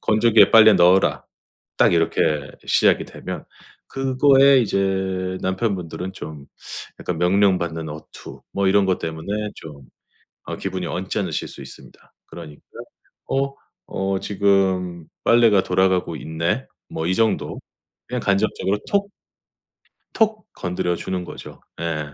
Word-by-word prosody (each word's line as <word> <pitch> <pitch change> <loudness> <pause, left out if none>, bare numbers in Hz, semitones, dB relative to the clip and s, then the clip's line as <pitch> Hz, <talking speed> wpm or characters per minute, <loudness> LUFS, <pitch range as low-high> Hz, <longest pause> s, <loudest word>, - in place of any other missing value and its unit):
"건조기에 110 +1 +4
빨래 110 -1 +8
넣어라." 90 0 +4 0.5
딱 - - +4
이렇게 80 -3 +1 0.2
시작이 - - +3
되면 - - -8 0.4
그거에 135 +1 +4
이제 95 -3 -1
남편분들은 95 -2 -2
좀 75 -6 -9 0.5
약간 90 - -3
명령받는 90 -3 +1
어투 75 +1 -11
뭐 100 0 0
이런 100 0 +3
것 95 -1 +1
때문에 100 +7 -4
좀 70 -4 -12 0.6
어 - - -5
기분이 95 -2 -4
언짢으실 95 +3 -3
수 - - -11
있습니다. - - -14
그러니까 80 -3 -11 0.7
어 135 0 0 0.3
'어 95 0 -2
지금 95 -4 0 0.2
빨래가 115 -4 +5
돌아가고 90 -2 +1
있네.' 85 - -2 0.2
뭐 80 - -4
이 90 - +1
정도. 115 +1 0 0.5
그냥 125 -1 -3
간접적으로 100 0 0
톡 200 0 0 1.0
톡 215 -2 +1
건드려 90 -1 -2
주는 90 +1 -4
거죠. - - -11 0.2
예. 75 -3 -3
95 Hz, 260 characters per minute, -21 LUFS, 85-105 Hz, 1.0 s, 빨래